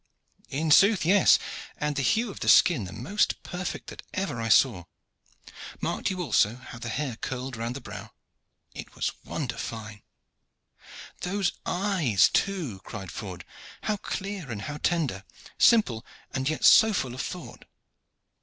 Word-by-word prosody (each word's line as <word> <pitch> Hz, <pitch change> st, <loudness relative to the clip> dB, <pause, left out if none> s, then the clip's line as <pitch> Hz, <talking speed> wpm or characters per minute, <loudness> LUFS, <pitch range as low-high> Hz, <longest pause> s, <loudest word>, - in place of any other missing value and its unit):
"In 155 Hz, +3 st, -1 dB
sooth, 200 Hz, +3 st, +6 dB
yes. 195 Hz, +2 st, +6 dB, 0.4 s
And 150 Hz, 0 st, -2 dB
the 140 Hz, -, 0 dB
hue 225 Hz, -, +1 dB
of -, -, -10 dB
the -, -, 0 dB
skin 150 Hz, -, +5 dB
the 90 Hz, -, -8 dB
most 165 Hz, -, -1 dB
perfect 180 Hz, 0 st, -5 dB
that -, -, -9 dB
ever 185 Hz, -12 st, -2 dB
I 115 Hz, -, -2 dB
saw. 105 Hz, -6 st, +4 dB, 0.9 s
Marked -, -, -1 dB
you 185 Hz, -2 st, -3 dB
also 110 Hz, -8 st, +2 dB
how 120 Hz, -2 st, -11 dB
the 120 Hz, -, -5 dB
hair 130 Hz, -2 st, -3 dB
curled 130 Hz, 0 st, -5 dB
round 115 Hz, +2 st, -4 dB
the 140 Hz, -, -6 dB
brow? -, -, -9 dB, 0.6 s
It -, -, -9 dB
was -, -, -1 dB
wonder -, -, -4 dB
fine." 110 Hz, -2 st, -6 dB, 1.2 s
"Those 195 Hz, 0 st, 0 dB, 0.2 s
eyes, 180 Hz, -, +2 dB
too!" 170 Hz, -, -1 dB
cried 95 Hz, -1 st, -8 dB
Ford. 90 Hz, -4 st, -7 dB, 0.4 s
"How 215 Hz, -1 st, 0 dB
clear 195 Hz, -6 st, -5 dB
and 105 Hz, -4 st, -5 dB
how 145 Hz, +8 st, -5 dB
tender 150 Hz, -, 0 dB, 0.4 s
simple, 130 Hz, -, +4 dB, 0.3 s
and 130 Hz, +1 st, -1 dB
yet 155 Hz, -, -1 dB
so 220 Hz, -1 st, +7 dB
full 130 Hz, -10 st, -2 dB
of 130 Hz, -, -4 dB
thought!" 180 Hz, -3 st, -7 dB
140 Hz, 155 wpm, -27 LUFS, 115-185 Hz, 1.2 s, so